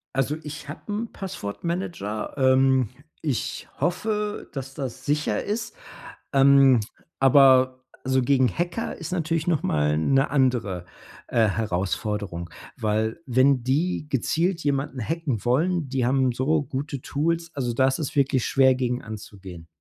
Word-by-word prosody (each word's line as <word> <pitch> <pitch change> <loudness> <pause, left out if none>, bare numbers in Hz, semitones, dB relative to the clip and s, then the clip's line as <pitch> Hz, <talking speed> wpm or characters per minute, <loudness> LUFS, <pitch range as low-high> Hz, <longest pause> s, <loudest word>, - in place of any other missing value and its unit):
Also, 135 +3 +1
ich 150 -1 -8
habe 145 - -7
'n 220 +3 -3
Passwort-Manager. 170 - -4
Ähm, 130 -2 +4 0.3
ich 140 -6 -3
hoffe, 210 +4 -1
dass 135 -1 -6
das 135 -5 -6
sicher 150 +1 0
ist. 220 - -3 0.6
Ähm, 135 -2 +6 0.4
aber 130 -1 +5 0.2
so 130 0 +2
gegen 130 0 +3
Hacker 175 - -3
ist 165 0 -7
natürlich 165 -2 -1
noch 160 -4 +1
mal 75 0 +1
'ne 135 - +2
andere, 120 -10 0 0.4
äh, 115 -2 +3
Herausforderung, 100 -3 -2 0.3
weil 110 +3 -1
wenn 130 0 +3
die 150 +5 0
gezielt 165 - 0
jemanden 140 -2 -1
hacken 150 - -2
wollen, 155 +5 +1
die 130 -2 0
haben 130 0 +2
so 145 +5 +1
gute 140 0 -5
Tools. 165 +4 -1
Also, 125 -4 -2
da 130 +2 +3
ist 130 - 0
es 150 - -4
wirklich 135 -3 +2
schwer, 130 -1 +4
gegen 125 -1 -1
anzugehen. 100 -5 -9
135 Hz, 135 wpm, -25 LUFS, 120-155 Hz, 0.6 s, Ähm